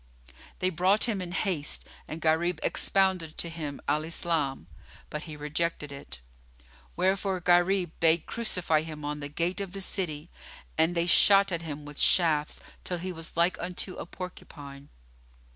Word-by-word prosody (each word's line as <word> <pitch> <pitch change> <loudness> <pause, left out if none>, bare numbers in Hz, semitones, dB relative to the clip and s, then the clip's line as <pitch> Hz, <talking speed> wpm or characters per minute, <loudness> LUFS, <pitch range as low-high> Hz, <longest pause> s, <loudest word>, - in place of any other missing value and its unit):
They 185 0 0
brought 185 +5 +3
him 215 -6 0
in 175 -1 -5
haste 180 -6 -1 0.2
and 155 - -5
Gharib 160 +1 +2
expounded 190 -5 +1
to 170 - -3
him 155 -4 -5
Al 150 +2 +2
Islam; 160 -4 -1 0.5
but 150 - -3
he 150 - -7
rejected 150 0 -2
it; 100 - -8 0.7
wherefore 190 +1 +1
Gharib 175 0 +3
bade 165 0 +4
crucify 180 -9 +1
him 155 -2 -7
on 150 0 -3
the 145 0 -5
gate 170 +6 -1
of 190 -2 -5
the 195 - -5
city, 165 -5 -3 0.4
and 160 +2 +2
they 170 0 +2
shot 195 +2 +6
at 170 -1 -1
him 150 -2 -6
with 145 -1 -7
shafts 155 -4 +3 0.2
till 180 - -2
he 185 +2 -4
was 165 -1 -6
like 170 +2 +3
unto 180 +1 -3
a - - -6
porcupine. 145 -6 -9
170 Hz, 160 wpm, -29 LUFS, 150-185 Hz, 0.7 s, shot